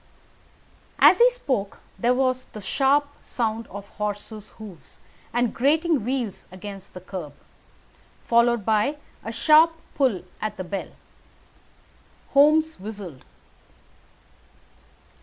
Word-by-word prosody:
As - - +7
he 485 +1 +8
spoke 260 - -3 0.2
there 245 +5 +3
was 255 -1 0
the 215 - -7
sharp 275 +8 +2
sound 225 -1 -2
of 200 0 -9
horses' 210 0 -4
hoofs 205 -7 -12 0.3
and 240 -1 0
grating 305 +1 +2
wheels 245 -4 -3
against 195 +1 -9
the 180 - -8
curb, 180 -6 -7 0.9
followed 235 -2 +3
by 220 +7 +2 0.3
a 225 - -5
sharp 310 +7 +5 0.2
pull 250 -11 +1 0.2
at 215 -1 -3
the 185 - -4
bell. 195 +2 -5 1.4
Holmes 310 +3 +4
whistled. 195 -8 -8
225 Hz, 105 wpm, -24 LUFS, 200-275 Hz, 1.4 s, he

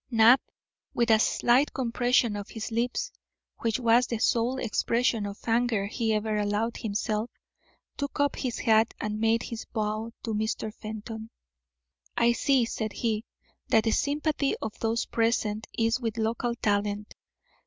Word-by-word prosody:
Knapp, 235 +2 +6 0.5
with 235 -1 +2
a 220 - +6
slight 245 +5 +3
compression 245 -2 +1
of 205 0 -6
his 225 +1 -6
lips, 245 - -1 0.5
which 230 +1 0
was 240 0 +4
the 235 - -2
sole 240 +2 +1
expression 230 -2 0
of 200 0 -7
anger 230 -3 +2
he 225 +2 -1
ever 215 0 0
allowed 210 +3 0
himself, 215 +1 -2 0.7
took 285 0 -4
up 285 0 +2
his 250 -4 -3
hat 220 -1 +3
and 210 0 -3
made 225 +1 +2
his 230 -2 -6
bow 215 0 -3
to 225 - -2
Mr. 220 0 -2
Fenton. 220 +1 -7 0.9
"I 235 0 +5
see," 250 +1 +2
said 220 -1 -3
he, 225 -1 -1 0.4
"that 220 - +4
the 225 - +1
sympathy 290 +2 0
of 215 - -4
those 225 +1 0
present 225 -2 0
is 225 +2 +2
with 230 -3 -3
local 230 +2 -1
talent. 205 -1 -1
225 Hz, 150 wpm, -28 LUFS, 215-240 Hz, 0.9 s, Knapp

